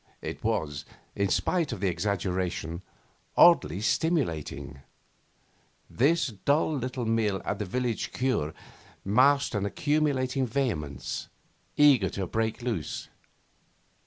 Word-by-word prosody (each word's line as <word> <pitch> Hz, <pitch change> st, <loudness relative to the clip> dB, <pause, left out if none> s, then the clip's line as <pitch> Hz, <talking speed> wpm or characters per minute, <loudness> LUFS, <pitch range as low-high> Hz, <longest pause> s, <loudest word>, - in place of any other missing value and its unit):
It -, -, -6 dB
was, 80 Hz, -11 st, -1 dB, 0.3 s
in 100 Hz, -1 st, 0 dB
spite 170 Hz, -, +1 dB
of -, -, -4 dB
the 100 Hz, -, 0 dB
exaggeration, 90 Hz, -3 st, -2 dB, 0.6 s
oddly 100 Hz, -, +6 dB
stimulating. 85 Hz, -, -1 dB, 1.1 s
This 155 Hz, +4 st, +2 dB
dull 150 Hz, +2 st, +2 dB
little 125 Hz, -2 st, -3 dB
meal 110 Hz, -3 st, +1 dB
at 100 Hz, -, -2 dB
the 105 Hz, -, -2 dB
village 120 Hz, +3 st, -2 dB
cure 125 Hz, -, -1 dB, 0.5 s
masked 135 Hz, +8 st, +4 dB
an 105 Hz, -2 st, -1 dB
accumulating 135 Hz, +2 st, 0 dB
vehemence, 110 Hz, -, -3 dB, 0.5 s
eager 140 Hz, -10 st, +6 dB
to 95 Hz, -, -3 dB
break 110 Hz, +5 st, -2 dB
loose. 110 Hz, -, -3 dB
110 Hz, 105 wpm, -28 LUFS, 95-135 Hz, 1.1 s, oddly